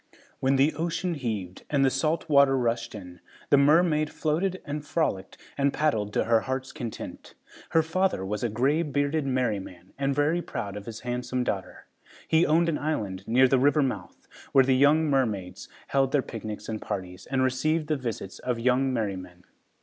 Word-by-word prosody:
When 135 +1 +2
the 140 +4 +3
ocean 170 +3 -2
heaved 110 - -4
and 140 -2 +3
the 135 - +3
salt 155 +6 0
water 140 -3 +5
rushed 115 -2 -1
in, 90 -3 -10 0.3
the 140 - +7
mermaid 155 +1 +4
floated 175 +6 -1
and 150 0 -4
frolicked 145 - -2 0.2
and 140 0 +3
paddled 135 -10 0
to - - +2
her 115 0 +3
heart's 130 +2 -4
content. 120 -7 -7 0.3
Her 160 - +3
father 165 - 0
was 105 +3 -3
a 120 - +1
gray 135 +9 +1
bearded 145 -1 0
merryman 100 -8 -2
and 140 0 0
very 150 +5 +2
proud 100 - -5
of 105 +1 -8
his 115 -2 -7
handsome 125 +1 -2
daughter. 95 -5 -4 0.4
He 160 +2 +3
owned 165 +2 +3
an 160 -3 0
island 100 -11 -3
near 130 +3 +5
the 130 0 +3
river 145 +2 +4
mouth, 105 -9 -5 0.3
where 135 -1 +6
the 130 0 +3
young 145 +4 +4
mermaids 110 -10 -1 0.2
held 135 -1 +1
their 140 -3 +3
picnics 110 -2 -7
and 110 -1 -4
parties 90 -1 -6
and 130 0 +1
received 150 +5 +1
the 155 0 0
visits 115 -7 -5
of 125 -2 -2
young 130 +2 +2
merrymen. 95 -6 -4
130 Hz, 180 wpm, -27 LUFS, 110-150 Hz, 0.4 s, the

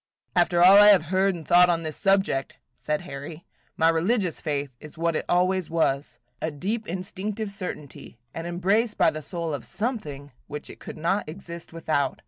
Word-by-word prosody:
"After 175 0 +4
all 190 +2 +9
I 205 0 +9
have 200 -5 +7
heard 190 0 +3
and 160 -3 -9
thought 180 0 +6
on 165 -1 +1
this 155 -1 -4
subject," 195 -8 +1 0.2
said 150 0 -2
Harry, 145 +4 -8 0.3
"my 160 - +4
religious 180 +3 +1
faith 145 -2 -2
is 155 +1 -13
what 165 0 0
it - - -2
always 185 0 +2
was, 145 -4 0
– 125 +1 -45
a 160 - -1
deep, 205 +9 -3
instinctive 195 +4 -4
certainty, 180 - -8 0.2
an 165 +1 -5
embrace 200 +6 +1
by - - +4
the 155 - -6
soul 170 -1 -4
of 145 - -4
something 150 - -4 0.2
which 150 0 -7
it - - -14
could - - -9
not 170 +3 -1
exist 170 0 -9
without. 155 -4 -1
170 Hz, 185 wpm, -25 LUFS, 155-195 Hz, 0.3 s, all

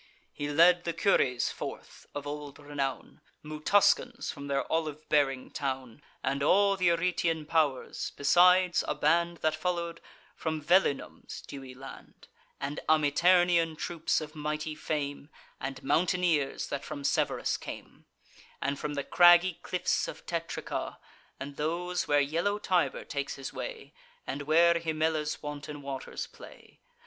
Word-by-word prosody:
He 145 0 -4
led 175 +4 +5
the 170 - -1
Cures 135 -8 +2
forth, - - -8
of 145 0 -4
old 145 -1 -6
renown, 145 -2 -4 0.2
Mutuscans 200 - +2
from 140 -1 -8
their 140 -1 0
olive 155 -1 -2
bearing 135 -3 +1
town, 130 -2 -4 0.2
And 140 +1 -1
all 200 +6 +4
th' - - -13
Eretian 170 -2 +1
pow'rs; 150 -6 0
besides 180 +4 +5
a - - -1
band 170 0 +2
That 155 - +3
follow'd 170 +1 -3 0.3
from 160 -1 -2
Velinum's 170 -1 0
dewy 135 -2 -9
land, 135 +1 -12 0.3
And 140 +2 -4
Amiternian 165 +2 +4
troops, 165 -1 -1
of 155 0 -8
mighty 150 0 -3
fame, 145 -2 -4 0.3
And 135 -1 -5
mountaineers, 170 -3 +1
that 140 0 -3
from 145 -2 -7
Severus - - +1
came, - - -9 0.5
And 140 0 -2
from 150 - -3
the 140 - -2
craggy 175 +1 +6
cliffs 180 - 0
of - - -9
Tetrica, 165 -1 -4 0.4
And 140 0 -7
those 175 +4 -1
where 145 0 +4
yellow 170 +8 0
Tiber 180 -9 0
takes 140 -1 -3
his 135 -1 -7
way, 470 -3 -7 0.3
And 145 - -4
where 170 +2 +6
Himella's 160 -2 -1
wanton 145 0 -6
waters 135 -1 -5
play. - - -15
155 Hz, 135 wpm, -29 LUFS, 145-170 Hz, 0.5 s, craggy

